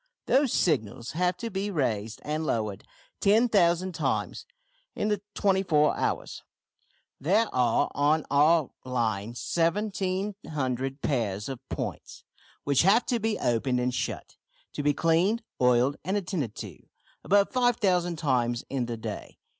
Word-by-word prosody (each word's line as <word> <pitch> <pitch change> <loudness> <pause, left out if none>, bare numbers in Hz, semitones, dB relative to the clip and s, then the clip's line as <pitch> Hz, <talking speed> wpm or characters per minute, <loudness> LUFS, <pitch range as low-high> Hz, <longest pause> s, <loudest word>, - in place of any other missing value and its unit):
Those 270 -1 +3
signals 120 - 0
have 180 +2 0
to 230 -1 -5
be 195 +2 -2
raised 115 - -2
and 155 +1 -2
lowered 110 -8 -2 0.4
10,000 195 -5 +3
times - - -2 0.5
in 210 - -1
the 210 -2 0
twenty 195 -2 +2
four 150 -5 +3
hours. - - -2 0.8
There 200 +10 +3
are 120 -2 +2
on 150 +2 +2
our 150 +1 +4
line 115 -3 -2
1700 170 - -2
pairs 105 -8 -1
of 135 -3 -5
points, - - -6 0.4
which 140 -2 +3
have 200 +7 +4
to 240 -3 0
be 220 0 -1
opened 125 +2 0
and 125 0 0
shut, - - -4 0.4
to - - -3
be 145 0 +2
cleaned, 175 +9 +2 0.2
oiled, 125 +2 +3
and 190 +5 0
attended 170 - -3
to, 95 -9 -8 0.4
above 200 +1 +3
5000 195 -9 +2
times 125 -6 0
in 130 -3 -1
the 120 -1 -4
day. 110 - -7
155 Hz, 135 wpm, -27 LUFS, 125-195 Hz, 0.8 s, our